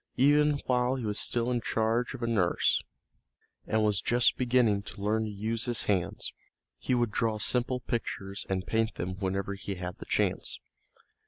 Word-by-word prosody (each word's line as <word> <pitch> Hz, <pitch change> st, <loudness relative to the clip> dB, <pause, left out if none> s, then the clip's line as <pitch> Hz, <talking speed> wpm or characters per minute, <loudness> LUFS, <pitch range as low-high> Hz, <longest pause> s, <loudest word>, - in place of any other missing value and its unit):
Even 145 Hz, +2 st, +4 dB
while 125 Hz, 0 st, +2 dB
he 125 Hz, -3 st, -4 dB
was 105 Hz, -1 st, -1 dB
still 120 Hz, +1 st, +1 dB
in 120 Hz, -1 st, 0 dB
charge 115 Hz, +4 st, 0 dB
of 125 Hz, -, -7 dB
a -, -, 0 dB
nurse, 100 Hz, -7 st, +2 dB, 0.9 s
and 110 Hz, 0 st, +2 dB
was 105 Hz, -3 st, +2 dB
just 120 Hz, 0 st, +3 dB
beginning 120 Hz, -5 st, +3 dB
to 100 Hz, 0 st, -10 dB
learn 110 Hz, +2 st, +1 dB
to -, -, -4 dB
use 110 Hz, +3 st, -2 dB
his 120 Hz, -2 st, 0 dB
hands, 95 Hz, -4 st, -1 dB, 0.5 s
he 130 Hz, -, 0 dB
would 120 Hz, -3 st, +1 dB
draw 110 Hz, 0 st, 0 dB
simple 125 Hz, +3 st, 0 dB
pictures 100 Hz, -5 st, -3 dB
and 95 Hz, -1 st, -1 dB
paint 110 Hz, 0 st, 0 dB
them 90 Hz, +2 st, -4 dB
whenever 100 Hz, 0 st, -1 dB
he 100 Hz, 0 st, -5 dB
had 90 Hz, 0 st, -6 dB
the -, -, -8 dB
chance. -, -, 0 dB
110 Hz, 175 wpm, -29 LUFS, 100-125 Hz, 0.9 s, Even